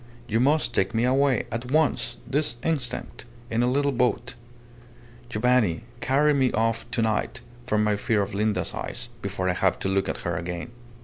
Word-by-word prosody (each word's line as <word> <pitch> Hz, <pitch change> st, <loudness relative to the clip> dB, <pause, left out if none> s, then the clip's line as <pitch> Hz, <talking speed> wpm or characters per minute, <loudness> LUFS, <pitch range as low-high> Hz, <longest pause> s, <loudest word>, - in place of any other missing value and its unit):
You 115 Hz, 0 st, +1 dB
must 135 Hz, -1 st, +2 dB
take -, -, +1 dB
me 115 Hz, -, +2 dB
away 130 Hz, 0 st, +3 dB
at 120 Hz, +3 st, -4 dB
once 155 Hz, -2 st, +2 dB
this 140 Hz, +1 st, 0 dB
instant 130 Hz, -7 st, -2 dB, 0.3 s
in 110 Hz, -, 0 dB
the 120 Hz, -, +3 dB
little 140 Hz, +3 st, +2 dB
boat. 125 Hz, -1 st, 0 dB, 1.0 s
Giovanni, 115 Hz, -5 st, +2 dB, 0.2 s
carry 145 Hz, +3 st, +3 dB
me 130 Hz, -3 st, +2 dB
off 115 Hz, +1 st, 0 dB
to 120 Hz, -1 st, 0 dB
night, 110 Hz, +2 st, -1 dB, 0.3 s
from 105 Hz, -2 st, +2 dB
my 105 Hz, -1 st, +2 dB
fear 105 Hz, 0 st, +1 dB
of 100 Hz, -, -6 dB
Linda's 105 Hz, +1 st, 0 dB
eyes, -, -, -5 dB
before 95 Hz, -2 st, -2 dB
I 90 Hz, -, +2 dB
have 95 Hz, 0 st, +1 dB
to 95 Hz, -, -2 dB
look 95 Hz, 0 st, +1 dB
at -, -, -4 dB
her -, -, -1 dB
again." 85 Hz, +4 st, -4 dB
120 Hz, 180 wpm, -25 LUFS, 105-130 Hz, 1.0 s, away